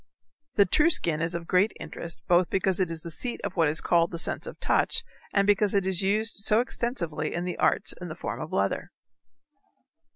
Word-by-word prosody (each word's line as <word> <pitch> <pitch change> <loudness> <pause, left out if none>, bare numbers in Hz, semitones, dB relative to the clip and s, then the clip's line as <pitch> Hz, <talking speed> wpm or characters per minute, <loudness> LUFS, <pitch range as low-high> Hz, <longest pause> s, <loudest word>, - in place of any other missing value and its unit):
The 200 - +5
true 300 - +4
skin 165 - +3
is 165 +1 -1
of 170 0 -4
great 185 +5 +2
interest 170 0 -5
both 175 -1 +4
because 190 -1 0
it 185 -3 +1
is 165 -1 -4
the 170 - -7
seat 240 +9 -4
of 200 -2 -4
what 165 -3 +3
is 155 - -2
called 170 -1 +2
the 170 - -6
sense - - -2
of - - -9
touch - - +1 0.3
and 200 -1 +2
because 205 0 +2
it 195 -2 +2
is 190 -2 +1
used 215 +4 0
so 210 +2 +2
extensively 180 - -2
in 175 +1 -2
the 180 - -4
arts - - +2
in 180 - -5
the 155 - -7
form 175 - -5
of 155 - -6
leather. 100 0 -1
180 Hz, 215 wpm, -27 LUFS, 165-200 Hz, 0.3 s, The